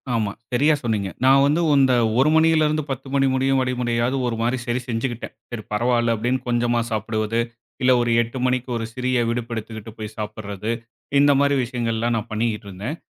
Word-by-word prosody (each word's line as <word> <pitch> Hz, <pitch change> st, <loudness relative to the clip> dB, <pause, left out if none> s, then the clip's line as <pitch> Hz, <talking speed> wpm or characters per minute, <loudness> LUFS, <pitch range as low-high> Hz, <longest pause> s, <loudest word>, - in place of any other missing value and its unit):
ஆமா, 110 Hz, -3 st, 0 dB, 0.2 s
சரியா 145 Hz, +5 st, +3 dB
சொன்னீங்க. 105 Hz, -4 st, -1 dB, 0.2 s
நான் 135 Hz, +1 st, +6 dB
வந்து 150 Hz, +4 st, +2 dB, 0.2 s
இந்த 135 Hz, -2 st, +4 dB, 0.3 s
1 135 Hz, +3 st, +5 dB
மணியிலிருந்து 155 Hz, -1 st, +3 dB
10 135 Hz, +1 st, -5 dB
மணி 135 Hz, -1 st, +3 dB
முடியும் 135 Hz, 0 st, +2 dB
வரை 125 Hz, 0 st, 0 dB
முறையாவது 120 Hz, +2 st, 0 dB
ஒரு 115 Hz, -, -1 dB
மாரி 120 Hz, +3 st, +1 dB
சரி 120 Hz, 0 st, -1 dB
செஞ்சுக்கிட்டேன். 120 Hz, +1 st, -3 dB, 0.2 s
சரி 120 Hz, -3 st, -6 dB
பரவாயில்ல 120 Hz, +1 st, +2 dB
அப்படின்னு 120 Hz, +4 st, 0 dB
கொஞ்சமா 120 Hz, 0 st, +1 dB
சாப்பிடுவது. 110 Hz, +1 st, -1 dB, 0.4 s
இல்ல 130 Hz, 0 st, +4 dB
ஒரு 120 Hz, -1 st, 0 dB
8 120 Hz, +3 st, -5 dB
மணிக்கு 125 Hz, 0 st, 0 dB
ஒரு 115 Hz, -, -3 dB
சிறிய 125 Hz, -1 st, 0 dB
விடுப்பு 115 Hz, 0 st, -3 dB
எடுத்துகிட்டு 110 Hz, 0 st, -7 dB
போய் 110 Hz, 0 st, -7 dB
சாப்பிடுறது. 105 Hz, 0 st, -4 dB, 0.5 s
இந்த 145 Hz, +1 st, +5 dB
மாரி 140 Hz, 0 st, +3 dB
விஷயங்கள்லாம் 120 Hz, -1 st, -1 dB
நான் 110 Hz, +1 st, -5 dB
பண்ணிக்கிட்டு 110 Hz, -1 st, -2 dB
இருந்தேன். 105 Hz, -, -5 dB
120 Hz, 175 wpm, -22 LUFS, 110-130 Hz, 0.5 s, நான்